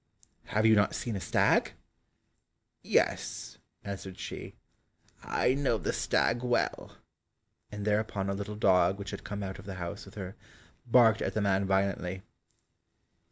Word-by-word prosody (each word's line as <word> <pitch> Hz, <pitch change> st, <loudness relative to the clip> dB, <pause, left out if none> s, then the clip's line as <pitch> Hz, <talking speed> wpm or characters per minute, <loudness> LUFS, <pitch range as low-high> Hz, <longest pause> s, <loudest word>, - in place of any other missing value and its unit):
"Have 110 Hz, +1 st, +1 dB
you 110 Hz, -, +7 dB
not 105 Hz, -1 st, +3 dB
seen 115 Hz, -3 st, -3 dB
a -, -, -2 dB
stag?" -, -, +2 dB, 1.1 s
"Yes," -, -, 0 dB, 0.2 s
answered 95 Hz, -2 st, -6 dB
she, -, -, -7 dB, 0.7 s
"I 125 Hz, -, +1 dB
know 135 Hz, -4 st, +1 dB
the -, -, -2 dB
stag 120 Hz, +1 st, +1 dB
well," 125 Hz, -1 st, -1 dB, 0.7 s
and 105 Hz, -1 st, -5 dB
thereupon 105 Hz, -2 st, 0 dB
a 100 Hz, -, 0 dB
little 100 Hz, +2 st, -5 dB
dog 95 Hz, -2 st, +4 dB
which 100 Hz, -, -6 dB
had -, -, -7 dB
come 105 Hz, 0 st, -5 dB
out 95 Hz, -1 st, -5 dB
of 90 Hz, -, -11 dB
the 95 Hz, -, -5 dB
house 90 Hz, +2 st, -6 dB
with -, -, -14 dB
her, 95 Hz, -1 st, -6 dB, 0.5 s
barked 115 Hz, -2 st, +5 dB
at -, -, -2 dB
the 110 Hz, -, +1 dB
man 100 Hz, -1 st, +2 dB
violently. 95 Hz, -1 st, 0 dB
100 Hz, 150 wpm, -30 LUFS, 95-110 Hz, 1.1 s, you